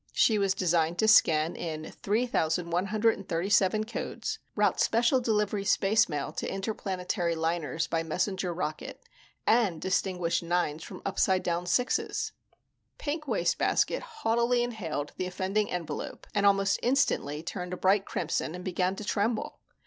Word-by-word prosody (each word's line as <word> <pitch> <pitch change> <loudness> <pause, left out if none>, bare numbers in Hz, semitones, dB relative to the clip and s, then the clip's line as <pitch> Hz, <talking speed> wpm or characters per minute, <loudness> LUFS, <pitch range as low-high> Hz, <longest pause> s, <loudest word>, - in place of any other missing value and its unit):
She 215 -2 +4
was 195 -1 +1
designed 170 -2 +1
to 220 - +2
scan 160 -6 +5
in 155 -2 -5
3,137 195 0 +1
codes, 230 +2 -4 0.2
route - - +2
special 235 +3 +3
delivery 210 -3 0
spacemail 195 -7 +1
to - - -2
interplanetary 190 -3 -2
liners 165 0 -1
by 165 - -1
messenger 180 +3 -1
rocket, 160 -3 -5 0.4
and 215 -8 +3
distinguish 185 -1 0
9s 170 -3 -1
from - - -9
upside 190 -1 +1
down 175 0 -1
6s. 245 +9 0 0.7
Pink 305 +1 -4
Wastebasket 205 -8 +1
haughtily 240 - 0
inhaled 175 -12 -4
the 185 - -2
offending 190 +3 -1
envelope 175 -3 -5
and 205 -1 +3
almost 195 0 +3
instantly 240 - +1
turned 180 +1 -5
a 180 - -3
bright 195 +2 +3
crimson 165 -2 -2
and 180 - -8
began 185 0 0
to 215 - -7
tremble. 215 +2 -1
190 Hz, 130 wpm, -29 LUFS, 170-215 Hz, 0.7 s, scan